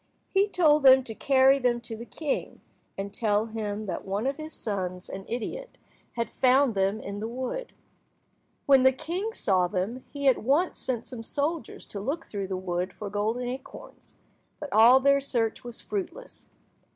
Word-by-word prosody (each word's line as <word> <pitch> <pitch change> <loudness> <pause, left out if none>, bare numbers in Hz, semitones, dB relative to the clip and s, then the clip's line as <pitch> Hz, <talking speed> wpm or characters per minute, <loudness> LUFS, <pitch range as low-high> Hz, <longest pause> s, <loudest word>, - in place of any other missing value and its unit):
He 395 +1 +4
told 310 -6 +4
them 265 -1 +7
to 225 - -7
carry 270 +3 +4
them 245 -2 +1
to 230 -1 -7
the 235 +2 -9
king, 300 -4 -3 0.4
and 200 +1 -5
tell 215 -2 +1
him 215 -1 -4
that 180 -4 -4
one 200 +4 -2
of 275 +1 -1
his 310 0 -7
sons, 185 - -4
an 195 0 -7
idiot, 245 - -5 0.4
had 235 -1 -2
found 260 +1 +3
them 195 +2 +1
in 200 -1 -6
the 220 - -3
wood. 260 - -4 0.9
When 275 -2 +6
the 260 0 +5
king 360 - -3
saw 185 - +2
them, 200 +7 -3
he 280 -1 -2
at 260 - +5
once 290 +10 +1
sent 240 -3 -2
some 250 -3 -7
soldiers 290 +3 -3
to 200 - -7
look 280 +11 -3
through 200 -2 -4
the 190 -1 -3
wood 180 0 -3
for 205 -2 -7
golden 215 +4 -1
acorns, 260 - -8 0.4
but 295 -3 -6
all 230 +5 +8
their 280 +1 +4
search 235 -5 -1
was 240 -1 -8
fruitless. 210 - -6
240 Hz, 175 wpm, -27 LUFS, 205-275 Hz, 0.9 s, all